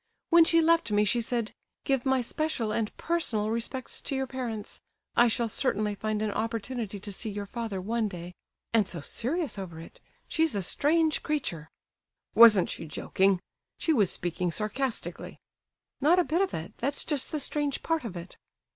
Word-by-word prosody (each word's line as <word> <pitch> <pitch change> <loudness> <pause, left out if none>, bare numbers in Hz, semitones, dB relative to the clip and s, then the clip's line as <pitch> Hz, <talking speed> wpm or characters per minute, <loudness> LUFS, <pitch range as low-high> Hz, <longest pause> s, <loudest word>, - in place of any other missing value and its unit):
"When 335 -1 +8
she 330 0 +5
left 330 -4 +3
me 210 0 +3
she 235 +4 +2
said, 230 -1 -2 0.3
'Give 270 -2 0
my 265 -1 +3
special 245 -3 -2
and 215 -1 -1
personal 230 -11 0
respects 235 +3 -3
to 275 - -3
your 265 0 0
parents; 240 -5 -5 0.3
I 240 - +6
shall 235 +1 0
certainly 210 -3 0
find 215 +1 -2
an 215 - 0
opportunity 225 0 -3
to 205 +1 -7
see 215 +3 -4
your 205 0 -4
father 220 -2 -4
one 220 +4 -1
day,' 180 -2 -7 0.4
and 215 -4 +4
so 170 -4 -4
serious 275 - -2
over 170 -4 -7
it. 165 - -12 0.3
She's 320 -6 +1
a 200 - 0
strange 315 - +2
creature." 175 - -3 0.6
"Wasn't 220 -5 +8
she 165 - -6
joking? 190 +4 +1 0.4
She 325 - +1
was 205 - +3
speaking 175 +1 -2
sarcastically!" 220 +7 -3 0.6
"Not 320 +6 +5
a 360 - +5
bit 335 +3 +1
of 390 - +1
it; 160 +1 -6
that's 280 +4 -1
just 290 -4 -1
the 305 - -1
strange 290 0 -1
part 325 -3 0
of 200 -7 -5
it." 170 +2 -9
230 Hz, 175 wpm, -28 LUFS, 205-280 Hz, 0.6 s, When